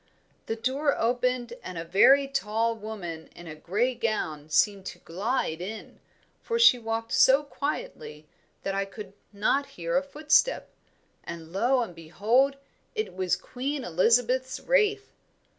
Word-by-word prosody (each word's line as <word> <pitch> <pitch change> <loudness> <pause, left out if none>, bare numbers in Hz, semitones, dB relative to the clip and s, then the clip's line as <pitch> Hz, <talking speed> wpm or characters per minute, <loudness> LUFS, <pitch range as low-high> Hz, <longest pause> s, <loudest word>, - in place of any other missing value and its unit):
"The 225 - -1
door 270 +5 0
opened, 245 0 0
and 180 -2 -7
a 165 - -4
very 270 +11 +5
tall 230 -2 0
woman 195 -7 -7
in 175 - -11
a 160 - -7
grey 205 +11 -1
gown 160 -11 -3
seemed 195 +4 +2
to - - -7
glide 185 -2 -2
in, 215 +4 -8 0.4
for 465 - -2
she 465 - +7
walked 225 0 -3
so 270 +3 +5
quietly 155 - -5 0.4
that 195 - -2
I 195 0 0
could 195 0 -10 0.2
not 265 +7 +1
hear 170 -1 -2
a 275 - +4
footstep; 300 - +1 0.5
and 165 -1 -9
lo 245 +6 +2
and 215 - -8
behold, 220 - +1 0.4
it 435 0 -3
was 185 -1 +1
Queen 275 +2 -4
Elizabeth's 245 +8 +2
Wraith." 425 -4 +1
225 Hz, 140 wpm, -27 LUFS, 185-265 Hz, 0.5 s, she